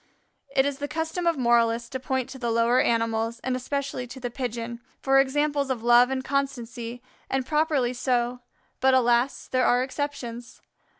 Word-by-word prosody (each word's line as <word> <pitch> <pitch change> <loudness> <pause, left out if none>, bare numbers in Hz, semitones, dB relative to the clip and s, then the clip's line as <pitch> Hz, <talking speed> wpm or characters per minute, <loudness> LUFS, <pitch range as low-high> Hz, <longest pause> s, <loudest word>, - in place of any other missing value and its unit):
It 265 0 +4
is 285 -1 -2
the 285 - -3
custom 325 +3 -2
of 335 -3 +2
moralists 235 -1 +2
to 260 - -4
point 260 -1 -2
to 265 - -9
the 240 -2 -1
lower 230 +2 +3
animals, 230 0 0
and 260 -1 -1
especially 265 -1 -3
to 260 - -9
the 245 -1 -4
Pigeon, 235 -2 -4 0.2
for 270 0 +4
examples 285 +1 +1
of 245 -4 -2
love 240 +1 +6
and 265 0 -2
constancy, 245 -3 -3 0.3
and 265 -1 0
properly 300 -4 +1
so, 245 -1 0 0.4
but, 265 0 +4
alas 245 +1 +2
there 255 0 +1
are 245 +1 +3
exceptions. 260 -4 -5
255 Hz, 170 wpm, -26 LUFS, 240-275 Hz, 0.4 s, love